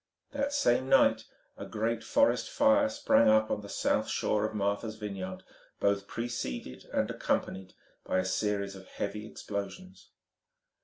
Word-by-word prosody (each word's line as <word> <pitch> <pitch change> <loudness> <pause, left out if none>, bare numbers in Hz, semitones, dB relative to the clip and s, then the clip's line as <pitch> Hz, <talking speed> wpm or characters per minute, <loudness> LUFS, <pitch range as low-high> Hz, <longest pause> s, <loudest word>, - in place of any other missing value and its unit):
That 280 0 -1
same 130 - +2
night - - +5 0.3
a - - -6
great 115 +1 -1
forest 285 0 +2
fire 280 0 +4
sprang 270 - +4
up 110 0 +4
on - - -1
the 100 - -10
south - - 0
shore 105 0 +1
of 110 - -8
Martha's 100 +2 -1
Vineyard, 100 -3 -6 0.4
both 100 0 +1
preceded 65 - -5
and - - +1
accompanied 95 -1 -2 0.3
by - - -1
a 95 - +1
series 100 +1 -1
of 95 -1 -12
heavy 105 +2 -4
explosions. 185 - -7
105 Hz, 145 wpm, -30 LUFS, 100-120 Hz, 0.4 s, night